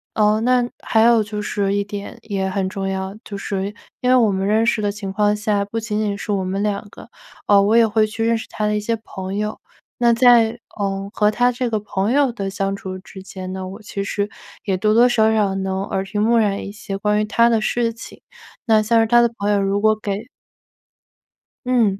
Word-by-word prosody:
呃， 215 0 +3
那 245 0 +2 0.2
还 220 - +2
有 230 -1 +5
就 210 0 -5
是 200 -1 -1
一 205 - +1
点， 205 +3 -7
也 195 -3 -2
很 190 0 -1
重 195 0 -4
要， 190 0 -4
就 200 - -7
是 195 0 -3 0.3
因 250 - +1
为 255 - +6
我 230 -4 +4
们 190 0 -1
认 220 +2 +3
识 230 -2 +1
的 205 -1 0
情 200 -2 -6
况 210 0 +2
下， 210 -1 0
不 225 +3 -4
仅 215 -2 -3
仅 205 -2 -1
是 210 - -5
我 195 -2 0
们 190 +2 -2
2 205 -1 -2
个， - - -13 0.4
呃， 200 -1 +6
我 215 +3 +3
也 230 -1 +6
会 215 0 +2
去 225 +1 -3
认 230 0 +2
识 - - -7
他 215 - -3
的 210 - 0
一 210 - 0
些 230 +2 -1
朋 190 -2 -6
友。 210 +1 -2 0.4
那 235 -1 +4
在， 235 -1 +5 0.2
呃， 195 -1 -2
和 210 0 +2
他 245 +3 +2
这 250 0 -2
个 220 -2 0
朋 200 +1 -2
友 275 -2 +3
的 195 -4 -4
相 195 0 -2
处 185 -1 -7
之 190 0 -12
间 185 -1 -7
呢， 190 - -5
那 185 - -5
我 200 +4 -9
其 200 -1 -5
实 205 0 -2 0.4
也 195 -3 0
多 215 +3 +2
多 240 +2 +6
少 220 -2 +3
少 205 -3 +1
能 190 0 -2
耳濡目染 205 +2 0
一 - - -6
些 200 -1 -6
关 210 +1 +1
于 215 - +1
他 230 +2 +3
的 225 -2 +2
事 230 +1 0
情， 230 - -11 0.5
那 220 -3 +4
像 230 +2 +3
是 225 - +1
他 240 +1 +5
的 235 - +3
朋 205 +1 0
友 200 -1 +2
如 195 +1 0
果 215 0 +4
给 215 +1 -4 1.4
嗯， 230 -6 +2
210 Hz, 250 characters per minute, -20 LUFS, 195-225 Hz, 1.4 s, 为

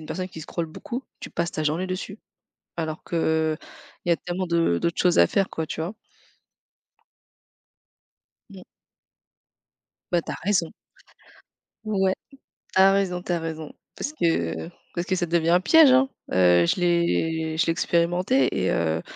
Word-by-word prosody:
une 155 - -10
personne 185 0 -4
qui 160 -3 -9
scrolle 165 +2 -4
beaucoup, 235 +10 -6 0.2
tu - - -9
passes 170 0 -2
ta 155 - -3
journée 155 +5 0
dessus. 185 +3 -5 0.6
Alors 160 -2 -4
que, 170 - -4 0.4
heu, - - -16 0.4
il - - -5
y - - +6
a - - +2
tellement 180 +2 -4
de 170 - +2
d'autres 170 - -1
choses 180 -1 +3
à 85 - +7
faire, 195 - 0
quoi, 160 - -3
tu 160 - -5
vois? 165 +5 -3 2.6
Mmh. 190 -2 -12 1.5
Bah, 175 -1 +2
tu - - -6
as - - -4
raison. 185 -4 +1 1.1
Ouais, 195 -3 +1 0.6
tu - - +4
as 195 +1 +7
raison, 190 -3 0
tu 180 - -3
as 175 - +1
raison. 160 -1 -6 0.2
Parce 290 - -4
que, 170 - 0
heu, - - -10 0.2
parce 175 0 -2
que 190 - 0
ça 175 - -1
devient 165 0 +1
un 175 +1 +5
piège 315 - +7
hein! 265 +1 +5 0.2
Heu, 90 -1 +5
je - - +1
l'ai 165 -2 +1
je - - +3
l'ai - - +2
expérimenté 175 +9 +2
et 95 - +1
heu 80 -1 0
170 Hz, 170 wpm, -24 LUFS, 160-185 Hz, 2.6 s, à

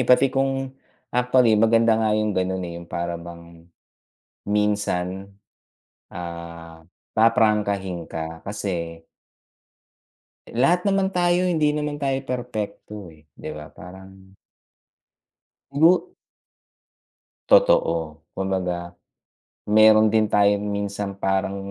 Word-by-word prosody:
pati 130 +1 +5
kung 135 0 -1 0.4
actually, 125 -1 +3
maganda 115 +1 +4
nga 110 -1 +2
yung 110 -1 0
gano'n, 95 0 -1
eh, 85 - -6
yung 85 - -13
para 85 0 -4
bang, 85 0 -13 0.8
minsan, 100 -2 -1 0.8
ah, 85 -1 -8 0.3
paprangkahin 105 -6 +1
ka 80 0 -6
kasi 85 -5 -4 1.5
eh, - - -11
lahat 175 - +2
naman 195 -1 +1
tayo, 175 0 +2
hindi 160 -4 +2
naman 150 -1 -3
tayo 135 -1 0
perpekto, 105 -6 -6
eh, 75 0 -22
di - - -7
ba? 75 -1 -9
Parang 95 +1 -14 1.4
Igu 170 - +3 1.3
Totoo. 85 - +3
Kumbaga, 90 -2 -3 0.8
meron 110 0 +6
din 110 -1 +3
tayong 100 0 +2
minsan 100 -1 -3
parang, 95 0 -1
100 Hz, 100 wpm, -23 LUFS, 90-125 Hz, 1.5 s, meron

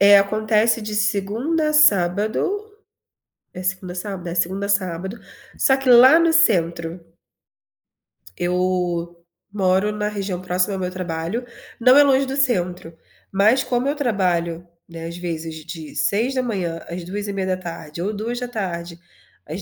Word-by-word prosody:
Eh, 200 0 +8
acontece 215 +3 +2
de 210 0 -5
segundo 210 +9 0
a 305 0 0
sábado, 205 -6 +3 1.1
é 185 - -7
segunda 185 -1 -3
a - - -11
sábado? 185 -2 -5
É, - - -5
segunda 190 +3 -1
a 200 - -5
sábado, 190 +1 -1 0.4
só 265 -1 +3
que 270 -1 -2
lá 255 +6 +8
no 335 -1 +3
centro. 170 - +2 1.4
Eu 175 -1 -1 0.3
moro 190 +1 +2
na 210 0 -2
região 195 -3 -4
próxima 185 +2 0
ao - - -4
meu 180 -1 -3
trabalho, 180 +5 -4 0.3
não 255 +3 +6
é 290 - +8
longe 275 -1 +3
do 270 0 -4
centro, 180 - -1 0.4
mas 215 +7 +3
como 250 +1 -1
eu 290 - 0
trabalho, 175 - -1 0.2
né, 165 -1 -8
as 170 - -7
vezes 165 -2 -5
de 165 -2 -8
6:00 215 -7 -1
às 175 +1 -5
14:30 185 -4 -4
ou 205 +4 -2
14:00 210 -7 -4 0.5
às 165 +6 -6
190 Hz, 140 wpm, -21 LUFS, 175-225 Hz, 1.4 s, Eh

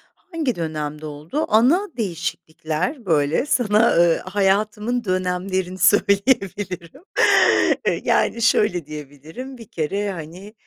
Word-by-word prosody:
Hangi 320 -8 -3
dönemde 155 -2 -4
oldu? 155 - -4
Ana 275 - +3
değişiklikler 175 - -4
böyle 155 - +1
sana, 230 -4 +3
ııı, 170 -1 +4
hayatımın 210 +5 0
dönemlerini 185 0 -2
söyleyebilirim. 200 - +1 0.8
Iıı, - - 0
yani, 230 - +1
şöyle 180 -7 +2
diyebilirim, 155 - -9
bir 230 -3 -12
kere, 195 +6 -2
hani, 180 +5 -9
190 Hz, 100 wpm, -21 LUFS, 165-225 Hz, 0.8 s, ııı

